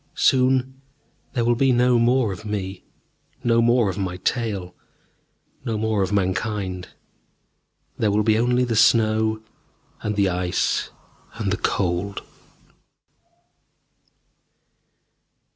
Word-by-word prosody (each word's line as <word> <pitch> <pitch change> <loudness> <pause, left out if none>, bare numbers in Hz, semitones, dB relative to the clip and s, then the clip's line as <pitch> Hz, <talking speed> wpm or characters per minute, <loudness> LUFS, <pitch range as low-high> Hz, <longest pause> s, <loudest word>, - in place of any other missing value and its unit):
Soon 130 0 +2 0.5
there 120 -4 0
will 120 - +3
be 130 +3 +2
no 125 0 +3
more 120 -3 +2
of 90 - -10
me, 100 -3 -5 0.6
no 115 -1 +3
more 120 -1 +3
of 95 +1 -3
my 90 -2 -3
tale 100 -5 -2 0.9
no 110 -2 -2
more 110 -1 0
of 95 0 -1
Mankind. 95 -1 -2 1.1
There 110 - +2
will 105 +1 +2
be 110 +1 +3
only 125 +1 +2
the 120 -2 -1
snow, 110 -1 +3 0.6
and 105 0 -2
the 100 -1 +2
ice, 90 -1 -1 0.5
and - - -2
the - - 0
cold 95 +1 -1
110 Hz, 110 wpm, -23 LUFS, 95-120 Hz, 1.1 s, will